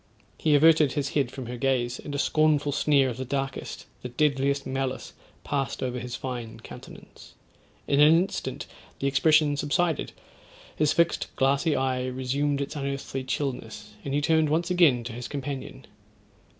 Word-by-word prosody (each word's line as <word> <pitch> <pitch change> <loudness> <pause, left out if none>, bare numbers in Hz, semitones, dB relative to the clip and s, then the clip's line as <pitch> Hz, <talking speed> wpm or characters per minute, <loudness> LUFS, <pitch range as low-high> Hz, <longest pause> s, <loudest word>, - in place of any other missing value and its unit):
He 155 -2 +3
averted 155 -1 +5
his 140 -2 -1
head 140 -4 0
from 130 0 -7
her 120 +1 -6
gaze, 125 -1 0
and 145 - -6
a - - -1
scornful 150 0 +2
sneer 140 -1 +3
of 120 -2 -4
the 130 - -3
darkest, 135 +1 -4 0.2
the 125 - -6
deadliest 140 +1 +1
malice 130 0 -3 0.3
passed 135 -3 -2
over 125 -1 -2
his 120 0 -5
fine 120 -4 -6
countenance. - - -13 0.5
In 140 - +2
an 150 +1 +8
instant, 185 +4 -1 0.3
the - - -4
expression 145 +2 +3
subsided; 160 +2 0 0.6
his 150 -1 +2
fixed 170 0 +1
glassy 140 +3 +2
eye 130 -1 0
resumed 140 +3 -1
its 140 +3 -4
unearthly 140 -1 -4
chillness, 125 -5 -4
and 140 0 -2
he 145 - +1
turned 160 0 +3
once 170 +4 0
again 155 -10 +4
to 115 0 -6
his 120 +1 -6
companion. 140 -2 -6
140 Hz, 160 wpm, -26 LUFS, 130-150 Hz, 0.6 s, an